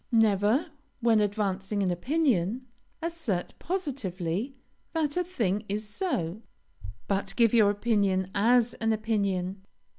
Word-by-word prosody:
Never, 225 Hz, -, +3 dB, 0.3 s
when 230 Hz, -2 st, +4 dB
advancing 200 Hz, -1 st, 0 dB
an 185 Hz, -, +1 dB
opinion, 245 Hz, -, +1 dB, 0.4 s
assert 320 Hz, -, -2 dB
positively 250 Hz, -, -3 dB, 0.4 s
that 305 Hz, -3 st, 0 dB
a 360 Hz, -, +2 dB
thing 220 Hz, -, -1 dB
"is 210 Hz, +2 st, -2 dB
so," 210 Hz, -, -2 dB, 0.7 s
but 195 Hz, 0 st, -1 dB
give 230 Hz, -2 st, +4 dB
your 215 Hz, -3 st, +6 dB
opinion 200 Hz, -3 st, +1 dB
as 235 Hz, +3 st, +3 dB
an 225 Hz, 0 st, 0 dB
opinion. 200 Hz, -4 st, -1 dB
215 Hz, 115 wpm, -28 LUFS, 195-250 Hz, 0.7 s, your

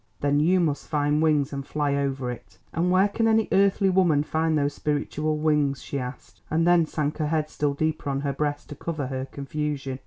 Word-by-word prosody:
"Then 145 Hz, 0 st, +2 dB
you 180 Hz, +5 st, +3 dB
must 150 Hz, -5 st, -1 dB
find 150 Hz, 0 st, +1 dB
wings 150 Hz, -3 st, +2 dB
and 140 Hz, 0 st, -3 dB
fly 145 Hz, 0 st, -1 dB
over 135 Hz, -3 st, -1 dB
it." 100 Hz, -5 st, -11 dB, 0.2 s
"And 175 Hz, +2 st, +1 dB
where 185 Hz, +2 st, +4 dB
can 225 Hz, +2 st, 0 dB
any 220 Hz, -1 st, +3 dB
earthly 195 Hz, 0 st, +3 dB
woman 175 Hz, -6 st, +3 dB
find 160 Hz, +1 st, 0 dB
those 145 Hz, 0 st, 0 dB
spiritual 150 Hz, +1 st, -1 dB
wings?" 150 Hz, -3 st, +1 dB
she 140 Hz, -, -4 dB
asked, 125 Hz, 0 st, -8 dB
and 165 Hz, +2 st, +1 dB
then 175 Hz, -2 st, +4 dB
sank 150 Hz, 0 st, -2 dB
her 155 Hz, -, 0 dB
head 155 Hz, 0 st, -1 dB
still 145 Hz, -1 st, -1 dB
deeper 155 Hz, -1 st, -1 dB
on 135 Hz, 0 st, -1 dB
her 140 Hz, -1 st, -1 dB
breast 145 Hz, +1 st, -3 dB
to 150 Hz, -, -7 dB
cover 155 Hz, -1 st, -4 dB
her 130 Hz, 0 st, -3 dB
confusion. 140 Hz, -1 st, -4 dB
150 Hz, 210 wpm, -25 LUFS, 140-160 Hz, 0.2 s, where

